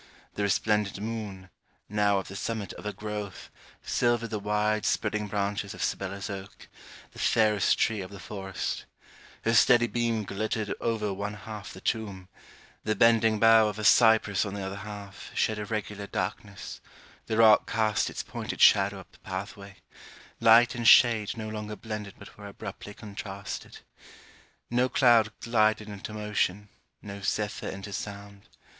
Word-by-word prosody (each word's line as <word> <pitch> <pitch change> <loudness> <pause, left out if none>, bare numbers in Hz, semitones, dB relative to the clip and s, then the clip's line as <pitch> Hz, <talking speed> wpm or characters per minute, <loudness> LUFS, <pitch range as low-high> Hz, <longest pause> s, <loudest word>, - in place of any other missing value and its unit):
The - - -4
resplendent 100 0 +1
moon, 105 -4 -6 0.4
now 105 -1 +2
at 95 - -6
the 100 - -9
summit 110 0 -4
of - - -11
her 105 - -1
growth, 105 -1 -6 0.3
silvered 120 -1 0
the 105 - -2
wide 105 +1 0
spreading 105 +2 0
branches 100 0 -2
of - - -4
Sibella's 95 0 -3
oak, 100 0 -8 0.4
the - - -13
fairest 105 -3 +3
tree 110 -3 +1
of 95 - -7
the 100 -1 -10
forest; 95 0 -5 0.6
her 115 - +1
steady 120 +1 +6
beam 115 -2 -1
glittered 110 +1 -2
over 110 -3 -1
one 100 +2 -4
half 105 -2 -8
the 95 - -11
tomb; 100 -5 -3 0.5
the 110 - 0
bending 115 0 +4
bough 115 -1 +6
of 105 0 -4
a 110 - -5
cypress 110 -3 +5
on 100 -1 -5
the 100 -1 -4
other 95 +1 -5
half, 100 -1 -9
shed 110 -1 +1
irregular 105 -1 -4
darkness; - - -5 0.5
the 110 - -1
rock 110 -2 +6
cast 110 -3 +1
its - - -5
pointed - - -6
shadow 100 0 +5
up - - -20
the - - -22
path 95 +2 -5
way; 100 -1 -12 0.6
light 115 +1 +6
and 120 -2 -1
shade 115 -4 +6
no 110 -1 -5
longer 105 0 -5
blended 105 -3 -6
but 100 - -14
were 100 - -8
abruptly 100 +1 -9
contrasted. 100 -2 -7 0.9
No 125 +2 +2
cloud 115 -5 +4
glided 110 -2 +2
into 105 +1 -7
motion, 105 -1 -1 0.3
no 100 -1 -8
zephyr 105 +1 -2
into 100 +1 -7
sound. 100 0 -7
105 Hz, 155 wpm, -28 LUFS, 100-110 Hz, 0.9 s, steady